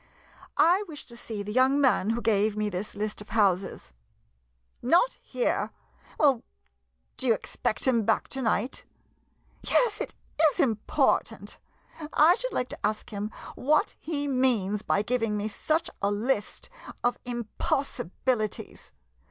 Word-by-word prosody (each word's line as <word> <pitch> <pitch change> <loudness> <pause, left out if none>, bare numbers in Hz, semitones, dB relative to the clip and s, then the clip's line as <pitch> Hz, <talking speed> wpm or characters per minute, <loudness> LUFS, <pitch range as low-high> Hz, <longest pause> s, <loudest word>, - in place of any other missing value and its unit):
] - - -18
I 360 +5 +5
wish 305 -3 -8
to 235 - -13
see 220 -3 -5
the 210 - -5
young 260 +3 +4
man 255 -7 +3
who 235 +1 -1
gave 215 -1 +2
me 210 0 0
this 190 +3 -4
list 210 0 -3
of 210 - -12
houses. 195 - +1 0.9
Not 345 - +4
here? - - -1 0.5
Well, 275 -6 +4 0.8
do 260 - -1
you 230 - +5
expect 215 - -3
him 240 -4 +3
back 220 - +1
to 270 - -4
night? 230 +1 0 0.8
Yes, 465 -4 +2
it - - -5 0.4
is - - -6
important. 225 -9 +1 0.5
I 320 +3 +7
should - - -2
like 250 - -1
to - - -9
ask 215 +3 -1
him 210 0 -3 0.2
what 300 +4 +2
he 290 -2 -2
means 240 -7 +1
by 205 - +1
giving 225 -2 0
me 205 +1 -1
such 310 +9 0
a 200 - +2
list 210 +1 -1 0.3
of 245 - +1
impossibilities. 240 -2 -2
235 Hz, 145 wpm, -27 LUFS, 210-270 Hz, 0.9 s, I